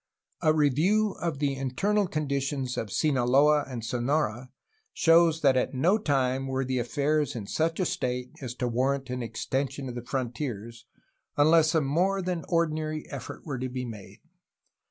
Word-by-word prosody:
A 155 -3 +4
review 160 +9 +2
of 165 -4 -2
the 140 -1 0
internal 190 +11 0
conditions 140 -4 -2
of 105 - -4
Sinaloa 145 +2 +3
and 120 -4 -6
Sonora 125 0 -1 0.4
shows 165 -1 +4
that 135 -3 +4
at 130 +1 0
no 175 +11 +3
time 135 -6 0
were 130 0 -1
affairs 140 +3 0
in 110 -4 -5
such 165 - -1
a 185 - +2
state 125 -4 -2
as 125 -2 -5
to 125 -1 -2
war 130 +4 +1
rant 135 -2 -6
an 125 0 -3
extension 135 +3 -3
of 125 - -5
the 120 - -5
frontiers, 120 -2 -4 0.5
unless 155 +2 +5
a 160 - +4
more 180 +7 +1
than 175 -2 -3
ordinary 155 -2 -1
effort 135 -3 -7
were 135 -5 -4
to 130 0 -3
be 125 0 -4
made. 110 -5 -10
140 Hz, 160 wpm, -27 LUFS, 125-155 Hz, 0.5 s, unless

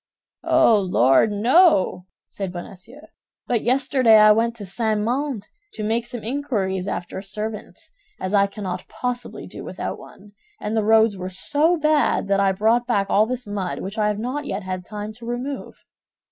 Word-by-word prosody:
"Oh, 220 -2 +5
Lord! 180 - +3
no," 215 - +3 0.2
said 195 -3 -5
Bonacieux, 195 - -10 0.4
"but 235 -3 0
yesterday 255 -2 +4
I 215 0 +7
went 230 +2 +2
to 210 -3 -8
St. 215 +3 0
Mandé 245 +1 -2 0.3
to 215 - -5
make 230 +2 -1
some 240 -2 -6
inquiries 215 -8 -2
after 175 - -4
a - - -9
servant, 210 +2 -5 0.4
as 185 +2 -4
I 200 -1 +4
cannot 190 -3 -6
possibly 245 0 -5
do - - -9
without - - -5
one; 205 +1 -15 0.3
and 210 +1 -3
the 220 - +1
roads 220 -1 +4
were 185 0 -5
so 295 - +1
bad 305 -8 +2
that 200 0 +2
I 195 -1 +3
brought 225 +5 +1
back 200 -5 0
all 215 +2 +4
this 255 0 -4
mud, 200 -3 -4
which 200 +3 -5
I 210 - +2
have 210 -1 -1
not 255 +7 -4
yet 195 +1 -4
had 185 -1 -5
time 210 +1 -6
to 230 +1 -12
remove." 250 +3 -5
215 Hz, 175 wpm, -22 LUFS, 195-245 Hz, 0.4 s, I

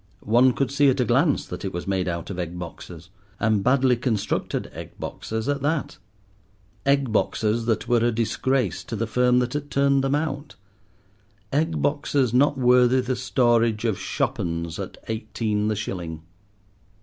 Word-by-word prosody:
One 120 +4 +5
could 135 0 -1
see 140 0 +4
at 135 +1 +1
a 125 - +3
glance - - +2
that - - -7
it 95 - -3
was 85 -1 -5
made 95 -2 -1
out 85 +1 -3
of 90 - -5
egg 90 0 -4
boxes, 85 0 -9 0.3
and 110 -3 +2
badly 130 0 +3
constructed 115 -4 -2
egg - - -9
boxes 110 +2 -4
at 145 -1 0
that—egg 105 - -3
boxes 110 +1 0
that 110 -2 0
were 120 -1 +3
a 120 - +3
disgrace 115 - 0
to - - -5
the - - -1
firm 125 0 +2
that 125 0 0
had 145 0 -4
turned 140 -1 +2
them 135 +1 +1
out; 145 -1 -3 1.0
egg 160 +3 0
boxes 145 -4 +1
not 140 +2 +3
worthy 125 0 +4
the 125 +1 -2
storage 120 -3 +2
of 110 -5 0
"shop - - -2
'uns" 85 -1 -3
at - - -6
eighteen 110 -1 -2
the 110 - 0
shilling. 85 -6 -5
120 Hz, 165 wpm, -24 LUFS, 100-135 Hz, 1.0 s, One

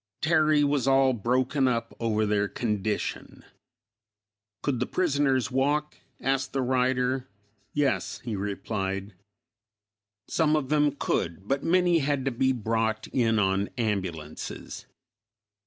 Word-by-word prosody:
Terry 155 -2 +3
was 140 -3 +1
all 135 -1 +4
broken 130 +4 +1
up 115 -2 -1
over 110 -2 +1
their 105 -1 +1
condition." 105 -2 -3 1.2
"Could 135 -4 0
the 125 - -1
prisoners 140 -7 +1
walk?" 145 +3 0 0.2
asked 135 0 -1
the 135 - 0
writer. 130 0 +1 0.5
"Yes," 145 -2 0
he 115 -4 -3
replied; 100 0 -3 1.1
"some 155 -2 +2
of 140 -4 -1
them 150 -1 +3
could, 85 -3 -2
but 135 +3 0
many 175 0 +3
had 140 -2 0
to 135 - +1
be 130 +2 +2
brought 110 -2 -1
in 115 -3 +2
on 95 0 +1
ambulances." 95 -9 -4
130 Hz, 120 wpm, -27 LUFS, 110-140 Hz, 1.2 s, all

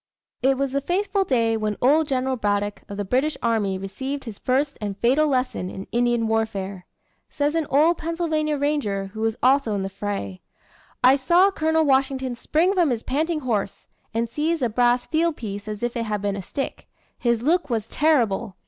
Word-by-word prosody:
It 265 0 +3
was 275 -1 -1
the 280 +1 0
fateful 390 +5 0
day 230 -8 +1
when 215 -1 -2
old 295 +5 +4
General 260 -1 0
Braddock 205 -2 -1
of 200 - -6
the 205 - -2
British 265 +9 0
army 215 -5 +1
received 265 +9 -5
his 225 -5 -8
first 275 +3 0
and 200 -2 -4
fatal 270 +8 +3
lesson 255 -9 -1
in 190 +1 -7
Indian 240 -1 +1
warfare. 200 -4 -2 0.4
Says 290 0 0
an 325 -3 0
old 315 +5 +3
Pennsylvania 315 -2 -1
ranger 215 -10 -1
who 220 - -6
was 225 0 0
also 255 -4 +3
in 195 - -2
the 195 - -3
fray: 195 - -4 0.6
"I 260 +2 +7
saw 345 +8 +4
Col. 320 -2 +1
Washington 265 -2 +1
spring 330 +10 +1
from 350 -5 +3
his 235 -3 -2
panting 310 +4 -1
horse, 215 -7 -2 0.3
and 230 +1 -1
seize 305 +4 -1
a 240 - +2
brass 245 +2 +2
field 325 0 0
piece 205 -2 -6
as 210 +1 -5
if 240 0 -1
it 230 -1 -1
had 210 -1 -2
been 200 -1 0
a 200 - -4
stick. 275 +9 -5 0.3
His 235 -2 +1
look 315 +1 +2
was 225 -4 -1
terrible. 235 - +1
255 Hz, 190 wpm, -23 LUFS, 215-300 Hz, 0.6 s, I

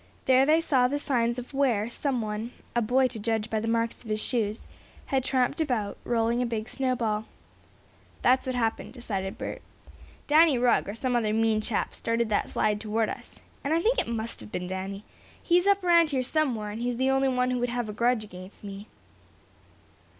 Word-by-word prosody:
There 260 +1 +5
they 315 +2 +5
saw 260 -6 +3
the 285 +3 -1
signs 240 -5 0
of 250 +2 -7
where, 245 -6 +2
some 255 +1 -2
one 215 +3 -4 0.2
a 240 - +3
boy 255 +4 +3
to 225 -2 -7
judge 220 0 -1
by 220 - +1
the 225 - -3
marks 230 +1 -1
of 225 - -11
his 215 0 0
shoes 220 -2 -1 0.4
had 265 -1 0
tramped 260 +3 +1
about, 235 -9 -1
rolling 235 0 +1
a - - +1
big 225 -1 -3
snowball. 230 -5 -1 1.0
"That's 260 +1 +3
what 255 - -1
happened," 225 -1 -1
decided 195 -6 -4
Bert. - - -5 0.6
"Danny 305 -2 +5
Rugg, 240 -4 +2
or 205 - -4
some 250 +1 -1
other 220 -3 +1
mean 220 -1 +2
chap, 215 -1 -1
started 230 0 -1
that 210 - 0
slide 210 -1 0
toward 220 0 0
us. - - -8 0.3
And 290 +3 +1
I - - +3
think 465 +8 +2
it - - -1
must 230 0 -4
have 105 -1 -11
been 180 - -3
Danny. 190 +2 -5 0.4
He's 355 +2 +2
up 400 -1 +3
around 340 -2 +5
here 265 -3 0
somewhere, 245 -7 0
and 220 +3 -6
he's 245 0 -1
the 260 +1 +2
only 270 0 +2
one 250 0 +1
who 250 - 0
would 245 0 0
have 240 -1 -2
a 210 - -5
grudge 235 0 +1
against 185 -1 -12
me." 200 +1 -8
235 Hz, 200 wpm, -27 LUFS, 215-260 Hz, 1.0 s, There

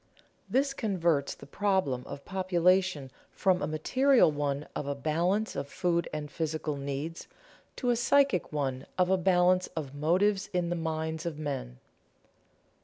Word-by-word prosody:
This 275 +2 +1
converts 170 - 0
the - - -13
problem 185 -8 0
of 140 0 -8
population 185 -5 +1 0.2
from 185 -1 +1
a - - -1
material 255 - +3
one 145 0 -2
of 145 - -3
a 140 - -1
balance 175 +9 0
of 140 - -3
food 170 +2 0
and 150 -1 -5
physical 155 -1 -2
needs, 140 +4 -5 0.5
to 245 -2 0
a - - +2
psychic 270 - +2
one 135 -3 -2
of 180 0 +3
a - - +5
balance 180 0 +3
of 145 -4 -4
motives 185 +7 +1
in 175 -1 0
the - - +1
minds 160 0 -3
of 160 -3 -4
men. 135 - -4
170 Hz, 150 wpm, -29 LUFS, 145-190 Hz, 0.5 s, a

